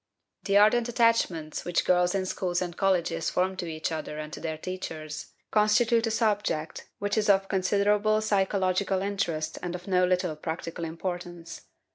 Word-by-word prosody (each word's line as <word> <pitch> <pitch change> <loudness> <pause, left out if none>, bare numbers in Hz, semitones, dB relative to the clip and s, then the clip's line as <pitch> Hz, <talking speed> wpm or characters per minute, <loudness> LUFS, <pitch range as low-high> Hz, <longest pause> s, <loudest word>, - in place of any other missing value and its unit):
The 200 -1 +3
ardent 225 +3 +4
attachments 230 -10 +1
which 175 -1 0
girls 180 +1 +3
in 190 -1 0
schools 180 -1 -1
and 175 -2 -4
colleges 175 -4 +1
form 185 +1 0
to 180 -2 -4
each 160 0 -3
other 155 -1 -4
and 155 0 -6
to - - -6
their 160 -1 -4
teachers 155 -3 -6 0.2
constitute 225 +2 +3
a - - +1
subject 205 -8 -1
which 205 +2 0
is 210 - 0
of 195 -1 +4
considerable 205 +3 +2
psychological 195 -2 +1
interest 175 -6 -2
and 175 0 -4
of 180 - -8
no 185 -1 +3
little 180 -2 +1
practical 165 +2 -5
importance. 175 0 -6
185 Hz, 160 wpm, -27 LUFS, 165-205 Hz, 0.2 s, ardent